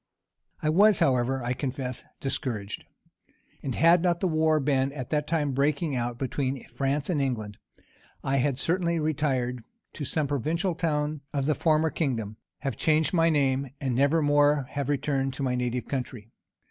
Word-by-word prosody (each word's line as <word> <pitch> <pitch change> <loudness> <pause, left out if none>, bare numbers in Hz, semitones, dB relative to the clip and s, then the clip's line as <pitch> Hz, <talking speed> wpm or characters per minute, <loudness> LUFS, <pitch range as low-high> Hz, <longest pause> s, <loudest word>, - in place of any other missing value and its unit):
I 155 - +2
was, 200 +4 +5
however, 130 0 +1
I 120 +1 0
confess, 130 -1 -4 0.2
discouraged; 115 -7 -3 0.8
and 130 -4 -3
had 165 +1 +5
not 175 -1 +1
the 190 - +1
war 155 -1 +2
been 135 -1 +1
at 130 -4 -6
that 150 -1 0
time 155 -3 0
breaking 140 +2 0
out 120 -1 -2
between 135 0 -2
France 140 +1 -1
and 160 -6 0
England, 110 -6 -3 0.6
I 135 +1 +1
had 135 0 +1
certainly 170 +2 0
retired 135 -6 -1 0.3
to 150 - -6
some 150 +2 -1
provincial 160 - -1
town 150 -3 -1
of 140 -2 0
the 155 - +3
former 155 +1 +2
kingdom, 115 -9 -2 0.2
have 135 0 -3
changed 155 +2 +2
my 165 -1 +4
name, 135 -3 +1
and 135 -4 -1
never 140 +5 +3
more 145 0 +4
have 140 -1 -3
returned 135 -1 0
to 140 - -4
my 130 -2 0
native 125 0 -2
country. 125 -5 -5
140 Hz, 165 wpm, -27 LUFS, 130-155 Hz, 0.8 s, was